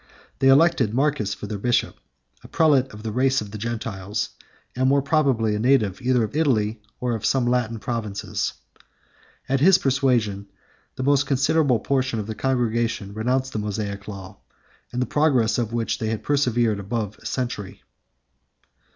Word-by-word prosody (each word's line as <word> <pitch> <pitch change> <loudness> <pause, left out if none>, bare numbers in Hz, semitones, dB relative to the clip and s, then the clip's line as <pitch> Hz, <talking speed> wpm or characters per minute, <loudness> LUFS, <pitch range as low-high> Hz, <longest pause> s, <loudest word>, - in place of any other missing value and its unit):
They 135 - +3
elected 135 -5 +4
Marcus 135 -7 0
for - - -8
their 105 -1 -5
bishop, 120 +3 +1 0.5
a - - -11
prelate 140 -5 +3
of 105 0 -11
the 110 - -3
race 130 +3 +2
of 105 -2 -7
the 105 - -7
Gentiles, 105 -3 -3 0.4
and 130 +1 +2
most 140 0 +2
probably 135 -8 +2
a 105 - -1
native 115 -4 +2
either 125 -1 +2
of 110 - -4
Italy 115 -8 +1 0.2
or 125 -1 -1
of 110 - -4
some 135 -2 +2
of - - -1
the 120 - +1
Latin 120 -2 0
provinces. 110 -3 -3 0.9
At 135 0 +1
his 185 +6 +6
persuasion, 125 - +1 0.5
the 130 - -4
most 140 +1 +3
considerable 140 -1 +2
part 135 +2 0
of 110 -2 -2
the 110 - -4
congregation 115 -4 -1
renounced 130 +5 -1
the 110 - -2
Mosaic 100 -1 -4
law, 95 -1 -9 0.5
in 125 - -2
the - - +1
practice 130 -8 +2
of 115 -2 -2
which 115 -1 -1
they 110 - -2
had 110 -1 -3
persevered 120 -7 +1
above 105 +1 -4
a - - -19
century. 110 -5 -4
120 Hz, 170 wpm, -23 LUFS, 105-135 Hz, 0.9 s, his